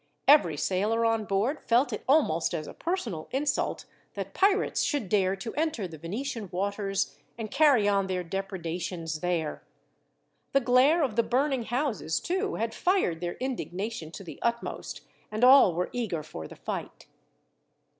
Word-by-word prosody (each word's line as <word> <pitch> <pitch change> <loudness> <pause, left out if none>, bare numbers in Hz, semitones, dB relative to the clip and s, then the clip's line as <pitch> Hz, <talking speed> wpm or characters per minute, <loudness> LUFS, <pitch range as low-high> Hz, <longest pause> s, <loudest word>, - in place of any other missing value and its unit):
Every 185 - +6
sailor 210 +8 +1
on 225 -1 +1
board 205 +10 0
felt 245 +4 +2
it - - -4
almost 180 - +3
as 155 -2 -3
a - - -9
personal 240 - -3
insult, 280 +1 -1 0.3
that - - -5
pirates 395 +1 +2
should 285 - -1
dare 190 -1 +2
to 210 +4 -6
enter 300 - -1
the 160 -3 -11
Venetian 215 - -4
waters 195 +1 -1 0.2
and 220 -2 -5
carry 275 -7 +5
on 200 -1 +2
their 185 -1 -2
depredations 170 -3 -4
there. 170 -3 -2 0.9
The 275 - +6
glare 265 +7 +4
of 240 -6 -2
the - - +6
burning 260 0 0
houses, 240 - -1
too, 385 +3 -1
had 225 0 -2
fired 355 - +1
their 175 -1 -3
indignation 220 -8 -4
to - - -8
the 170 - -10
utmost, 235 0 -3 0.3
and 215 +3 -2
all 255 -9 +8
were 180 +1 -1
eager 205 -11 -2
for 80 - -8
the - - -12
fight. - - -6
215 Hz, 155 wpm, -28 LUFS, 180-265 Hz, 0.9 s, all